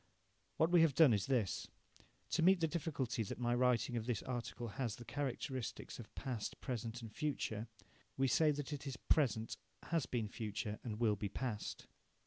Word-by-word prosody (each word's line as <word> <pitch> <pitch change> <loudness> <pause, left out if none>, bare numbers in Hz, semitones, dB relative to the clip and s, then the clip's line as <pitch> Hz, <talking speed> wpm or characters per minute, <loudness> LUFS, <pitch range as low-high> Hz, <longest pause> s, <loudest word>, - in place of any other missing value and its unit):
What 160 +2 +3
we 175 -2 +7
have 160 -5 +4
done 150 -7 +8
is 100 -2 +1
this 120 -8 +1 0.6
to 170 - +2
meet 185 +2 +6
the 165 - +3
difficulty 150 -8 -1
that 105 - -3
my 120 -1 +1
writing 125 -1 +3
of 115 0 -2
this 120 -4 0
article 120 -1 -4
has 120 -2 -2
the 120 - -10
characteristics 130 -3 -3
of 115 - -10
past, 125 -6 -3
present 120 -2 -4
and 110 -2 -8
future, 115 -7 -2 0.5
we 135 0 +3
say 155 +5 +4
that 145 0 -1
it 145 0 -5
is 130 -2 -4
present, 120 -8 +1 0.3
has 165 -4 0
been 115 -4 -1
future, 105 -1 -3
and 110 -3 -4
will 110 -3 +4
be 100 0 -3
past. 110 -2 -3
125 Hz, 180 wpm, -38 LUFS, 110-145 Hz, 0.6 s, done